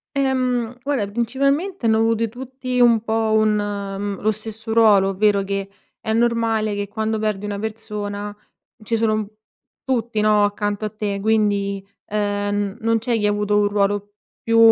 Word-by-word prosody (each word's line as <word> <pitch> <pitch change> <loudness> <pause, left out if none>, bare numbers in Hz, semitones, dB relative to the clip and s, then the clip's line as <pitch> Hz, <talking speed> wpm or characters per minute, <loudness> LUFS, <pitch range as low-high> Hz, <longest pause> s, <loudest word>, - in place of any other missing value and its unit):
Ehm, 255 -3 0
guarda, 270 -6 0
principalmente 275 - 0
hanno 220 -1 +4
avute 225 0 +2
tutti 255 +1 -4
un 235 -2 +5
po' 220 -1 0
un 215 -1 +3
mhmm, 200 -1 -3
lo 215 +1 +2
stesso 220 +1 -5
ruolo. 205 -4 +5
Ovvero 200 0 +2
che, 195 0 -3 0.3
è 220 - -1
normale 225 -2 +1
che 205 0 -3
quando 220 +1 -2
perdi 210 -2 -1
una 205 -1 -3
persona 210 -1 -5 0.5
ci 230 +2 -1
sono 225 -1 +2
un 215 -1 -1 0.6
tutti, 235 -4 -1
no, 210 -1 +4
accanto 205 +1 -2
a 215 - -1
te. 205 -2 -3
Quindi, 200 -2 +1 0.2
ehm, 205 0 -1
non 230 0 +2
c'è 230 +1 0
chi 210 - +2
avuto 205 0 +1
un 205 - +3
ruolo 205 0 0 0.3
più 230 0 +1
215 Hz, 160 wpm, -21 LUFS, 205-230 Hz, 0.6 s, un